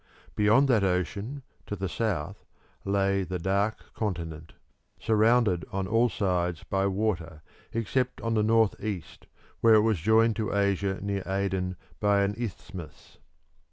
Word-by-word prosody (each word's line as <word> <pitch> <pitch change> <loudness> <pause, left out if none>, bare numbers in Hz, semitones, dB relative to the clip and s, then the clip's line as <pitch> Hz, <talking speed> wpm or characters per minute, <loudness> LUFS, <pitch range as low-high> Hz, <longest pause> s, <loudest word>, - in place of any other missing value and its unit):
Beyond 110 +7 +4
that 110 -5 +4
ocean, 100 - -2 0.2
to 105 - -3
the 95 0 -3
south, 90 -4 -3 0.4
lay 100 0 +1
the 90 0 -3
Dark 100 +5 -1
Continent, 80 -6 -4 0.5
surrounded 110 -5 +3
on 95 0 -2
all 115 +4 +3
sides 90 -5 -1
by 95 0 0
water 90 -6 -2 0.3
except 125 +3 -1
on 115 0 -1
the 110 - +2
north 110 0 +2
east, 100 -6 -6 0.3
where 115 -1 +6
it 105 - +6
was 110 -4 +1
joined 110 +5 +4
to 110 -2 -2
Asia 100 -1 +1
near 100 -1 -2
Aden 95 -1 -1 0.2
by 100 -1 +3
an 100 +1 0
isthmus. 95 -8 -8
100 Hz, 140 wpm, -28 LUFS, 95-110 Hz, 0.5 s, where